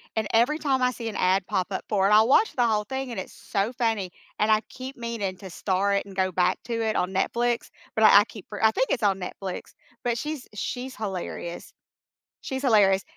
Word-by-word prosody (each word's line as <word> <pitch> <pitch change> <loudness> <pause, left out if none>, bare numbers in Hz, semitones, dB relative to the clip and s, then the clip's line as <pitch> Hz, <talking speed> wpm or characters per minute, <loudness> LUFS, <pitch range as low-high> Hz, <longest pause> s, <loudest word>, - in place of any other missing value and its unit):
and 220 -1 0
every 245 +8 +3
time 270 -3 +1
I 250 - +3
see 230 -2 -5
an - - -7
ad 185 0 +2
pop 190 -3 0
up - - -3
for 195 -2 +3
it, - - +2
I'll 215 +2 +6
watch 425 +11 +4
the 245 -2 +3
whole 215 -1 +1
thing, 265 +4 -4
and 235 - -4
it's 190 - -7
so 205 +5 -2
funny. 225 -6 -1 0.3
And 215 +1 +2
I 215 - +4
keep 260 +1 -8
meaning 230 -6 -4
to 190 -2 -9
star 195 +3 0
it 200 - 0
and 195 -1 -12
go 185 -1 +1
back 180 +1 +1
to 235 - -4
it 220 - 0
on 180 - 0
Netflix, 235 +5 0 0.2
but 220 - +2
I 200 - +9
I 205 - +4
keep 210 -4 -11 0.2
I 220 - +6
think 265 - +1
it's 245 - 0
on 195 -2 +2
Netflix, 185 0 -6 0.3
but 240 -1 +1
she's 300 0 -5
she's 250 +4 -4
hilarious 185 -4 -5 0.7
she's 265 +1 -4
hilarious, 200 -6 +4
215 Hz, 225 wpm, -26 LUFS, 195-245 Hz, 0.7 s, I